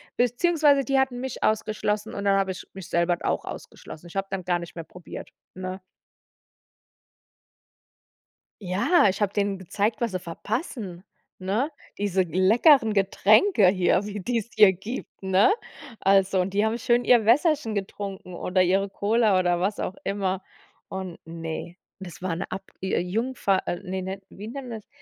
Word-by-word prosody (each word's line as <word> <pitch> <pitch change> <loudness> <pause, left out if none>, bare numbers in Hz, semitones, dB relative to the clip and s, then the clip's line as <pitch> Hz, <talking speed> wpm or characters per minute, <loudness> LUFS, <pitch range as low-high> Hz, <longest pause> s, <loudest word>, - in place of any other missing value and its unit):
beziehungsweise 285 +3 +3
die 275 -1 +2
hatten 260 -2 0
mich 260 0 -5
ausgeschlossen 215 0 0
und 200 - -4
dann 195 -1 +4
hab 195 - +1
ich 185 - -5
mich 190 -2 -9
selber 170 0 +2
auch - - 0
ausgeschlossen. 155 +2 -9
Ich 170 - -14
hab 195 0 -2
dann 190 -2 -4
gar 175 -1 +1
nicht 170 0 -9
mehr 165 - -5
probiert, 175 +2 -10 0.2
ne? 185 +1 -5 2.9
Ja, 205 - +3
ich 190 +2 -2
hab 205 -1 0
denen 200 -1 0
gezeigt, 200 +4 -1
was 235 -4 -1
sie 185 - -2
verpassen, 200 - -5 0.4
ne? 210 +10 0 0.3
Diese 195 -2 0
leckeren 220 - +4
Getränke 210 - +4
hier, 185 +1 +3
wie 205 -1 -5
die's 235 +1 -2
hier 205 -3 +7
gibt, 205 +8 -7
ne? 190 - +4 0.5
Also, 195 -1 +3
und 180 - -1
die 205 - +3
haben 220 +2 0
schön 240 +1 +2
ihr 240 -3 +5
Wässerchen 285 -2 +3
getrunken 195 -2 -5
oder 185 +2 +1
ihre 195 +2 +2
Cola 210 +1 +2
oder 175 -1 +2
was 195 +4 -1
auch 190 - -3
immer. 195 -1 -2 0.4
Und 190 -2 -6
ne, 165 +1 -6 0.2
das 180 -2 -10
war 180 -3 -1
'ne 185 - -4
Ab 195 +1 -4 0.2
Jungfahrt 195 +2 0
äh, 175 - -2
ne, 190 +1 -4
wie 205 +2 -10
nennt 260 +2 -7
man 225 - -5
das? - - -32
195 Hz, 160 wpm, -25 LUFS, 185-225 Hz, 2.9 s, hier